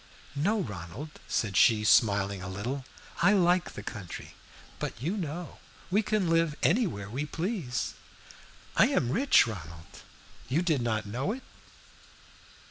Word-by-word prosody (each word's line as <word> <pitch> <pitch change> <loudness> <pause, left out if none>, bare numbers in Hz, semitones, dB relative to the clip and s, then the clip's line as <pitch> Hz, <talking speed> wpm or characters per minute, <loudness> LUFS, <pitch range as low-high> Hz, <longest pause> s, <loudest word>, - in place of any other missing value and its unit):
"No, 205 +9 +1
Ronald," 105 - -6 0.2
said 105 -4 -1
she, 105 +1 +5
smiling 100 0 +3
a 90 - -5
little; 125 +8 -4 0.4
"I 205 - +6
like 180 -2 +3
the - - -7
country. 95 -7 -7 0.5
But, - - -4
you 165 - -1
know, 175 -2 -5 0.3
we 205 +4 +4
can 210 -3 0
live 165 -2 +2
anywhere 170 - +2
we 130 +8 -3
please. 155 - -2 0.8
I - - +6
am 120 - +1
rich, 265 - +5
Ronald 85 -7 -9 0.5
you 155 +7 +2
did 160 -7 +1
not 110 -2 -1
know 125 - -2
it?" 260 - -8
135 Hz, 135 wpm, -29 LUFS, -, 0.8 s, I